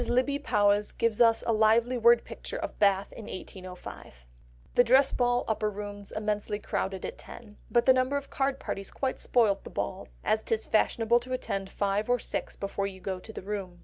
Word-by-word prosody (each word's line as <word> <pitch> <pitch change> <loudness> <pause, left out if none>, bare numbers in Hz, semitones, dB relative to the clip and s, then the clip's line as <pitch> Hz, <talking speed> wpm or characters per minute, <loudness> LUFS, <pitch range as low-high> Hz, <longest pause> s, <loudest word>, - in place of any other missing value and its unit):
Lybbe 260 +3 +1
Powys 205 -2 +2
gives 230 -1 0
us 230 -1 +5
a 230 - +2
lively 225 +3 +3
word 235 0 +5
picture - - -6
of - - -6
Bath 200 -1 +2
in 220 - -9
1805— 185 - -8 0.6
"The 245 - +6
Dress 260 +3 +5
Ball, 245 0 +1
Upper 215 -1 0
Rooms 205 0 -7
immensely 210 -1 -2
crowded 190 -2 -3
at - - -6
ten; 210 -3 -12
but 240 -1 +3
the 260 - +7
number 255 +2 +1
of 280 - -7
card 270 0 0
parties 195 -1 -5
quite 265 -1 -3
spoilt 215 -5 +2
the - - -9
balls, - - -5
as 220 - +2
'tis 220 0 -1
fashionable 225 +2 +2
to 255 +2 -6
attend 195 -6 -3
five 200 +2 -1
or 245 - +4
six - - -4
before 200 0 -3
you 190 -1 -9
go 185 0 -4
to 220 - -10
the 215 - -8
room. 190 -3 -5
215 Hz, 195 wpm, -28 LUFS, 200-245 Hz, 0.6 s, the